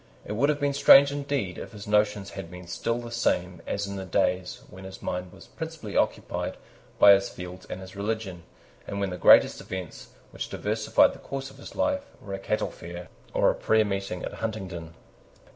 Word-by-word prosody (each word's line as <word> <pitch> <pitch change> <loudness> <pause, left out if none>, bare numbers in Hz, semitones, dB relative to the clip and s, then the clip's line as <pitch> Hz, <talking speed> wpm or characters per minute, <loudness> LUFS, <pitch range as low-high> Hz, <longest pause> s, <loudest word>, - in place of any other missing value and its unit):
It - - -6
would 120 +7 +2
have 150 -1 +1
been 145 -1 +1
strange 140 0 +8
indeed 140 -10 -2
if - - -8
his 105 -1 -9
notions 105 -1 +1
had 95 -4 -7
been 90 0 -10
still 105 +6 -2
the 120 -1 -7
same 90 -7 0
as 100 - -1
in 100 0 -5
the 95 - -4
days 90 +5 0
when 95 -9 -12
his 95 0 -9
mind 90 0 -4
was 95 - -14
principally 160 -10 -7
occupied - - -1 0.4
by 100 - +9
his 100 0 +2
fields 90 0 -9
and 95 - -5
his 95 +1 -11
religion, 100 -3 -3 0.5
and 100 - -4
when 100 -2 -1
the 90 - -4
greatest - - +6
events 90 -10 -7 0.2
which - - -5
diversified - - +2
the - - -12
course 135 0 -6
of - - -16
his - - -10
life 280 -1 +1 0.2
were 100 - -8
a 95 - -3
cattle 110 +2 -1
fair 85 0 -9 0.3
or - - +4
a - - -2
prayer 110 -1 +2
meeting 100 -2 -3
at - - -6
Huntingdon. 95 -7 -5
100 Hz, 200 wpm, -27 LUFS, 90-115 Hz, 0.5 s, by